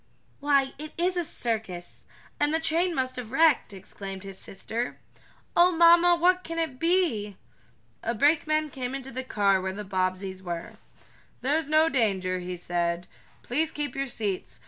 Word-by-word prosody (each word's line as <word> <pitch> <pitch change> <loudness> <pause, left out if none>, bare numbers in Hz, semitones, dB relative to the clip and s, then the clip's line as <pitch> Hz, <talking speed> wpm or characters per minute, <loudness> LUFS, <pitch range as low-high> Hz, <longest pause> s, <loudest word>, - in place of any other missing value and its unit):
"Why, 275 -2 +2
it 305 0 -7
is 360 +2 +1
a 350 - 0
circus 220 - -3 0.3
and 290 0 +2
the 320 - +2
train 330 +2 +1
must 255 -1 -1
have 250 - -4
been - - -13
wrecked!" 320 -9 +4
exclaimed 195 0 -8
his 195 -1 -8
sister. 230 +5 -5 0.6
"Oh 350 +1 +6
mamma, 340 +1 +6
what 360 +2 +3
can 330 0 -5
it 320 -6 -2
be?" 300 - +1 0.6
A 235 +1 -2
brakeman 310 +3 +2
came 255 0 -4
into 270 0 -7
the 260 +2 -4
car 200 -6 +2
where 190 0 -3
the 210 +1 -6
Bobbseys 185 0 -2
were. 175 -2 -6 0.6
"There's 295 +3 0
no 310 +1 +5
danger," 195 - +1
he 180 0 -5
said. 175 0 -1 0.4
"Please 305 +6 0
keep 295 -4 -4
your 275 0 -1
seats. 205 -6 -3
255 Hz, 165 wpm, -27 LUFS, 195-320 Hz, 0.6 s, Oh